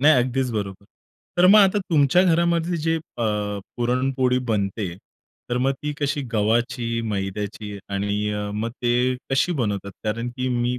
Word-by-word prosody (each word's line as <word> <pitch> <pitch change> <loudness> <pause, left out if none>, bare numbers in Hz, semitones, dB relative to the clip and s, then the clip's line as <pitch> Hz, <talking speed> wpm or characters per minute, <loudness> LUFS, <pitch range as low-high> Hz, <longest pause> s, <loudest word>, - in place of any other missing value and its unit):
नाही, 155 +3 +7
अगदीच 125 +1 +1
बरोबर. 100 -2 -4 0.5
तर 180 - +7
मग 210 +3 +8
आता 200 0 +5
तुमच्या 150 +3 +5
घरामध्ये 170 0 +2
जे 165 +1 0
अ, 135 -7 -5 0.5
पुरणपोळी 125 +1 +1
बनते, 100 -3 -1 0.6
तर 120 - +1
मग 135 +2 +2
ती 150 0 -2
कशी 145 0 0
गव्हाची, 115 +2 +1
मैद्याची 100 +1 -4
आणि 100 +1 -1
अ, 105 0 -3
मग 110 +2 -2
ते 125 +1 +2 0.2
कशी 135 +6 +2
बनवतात, 100 -2 -2
कारण 115 +3 -1
की 130 0 -1
मी 120 0 0
120 Hz, 150 wpm, -23 LUFS, 105-145 Hz, 0.6 s, मग